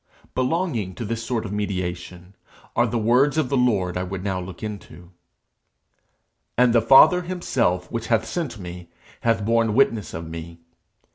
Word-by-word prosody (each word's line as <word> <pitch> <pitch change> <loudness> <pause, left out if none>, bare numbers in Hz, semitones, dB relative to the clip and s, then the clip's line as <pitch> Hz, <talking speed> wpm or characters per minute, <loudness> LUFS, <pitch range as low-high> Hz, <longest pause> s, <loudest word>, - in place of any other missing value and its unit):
Belonging 130 - -1
to 115 - -5
this 115 +2 -3
sort 115 -1 -2
of 100 - -6
mediation 90 -2 -4 0.4
are 120 +1 +3
the 120 - -2
words 125 +7 +3
of 150 -5 +1
the 140 - 0
Lord 100 -9 +1
I - - -1
would 95 0 -5
now 95 -2 -1
look 90 +2 -9
into. 100 -4 -8 1.5
'And 125 -1 +4
the 115 - +5
Father 135 - +7
himself 120 - -1
which 115 -1 -4
hath 115 -1 +2
sent 155 -2 -4
me, 90 -2 -9 0.3
hath 115 -3 +1
borne 115 -1 +2
witness 115 -5 +1
of 80 0 -6
me. 85 +1 -8
110 Hz, 160 wpm, -23 LUFS, 90-125 Hz, 1.5 s, Father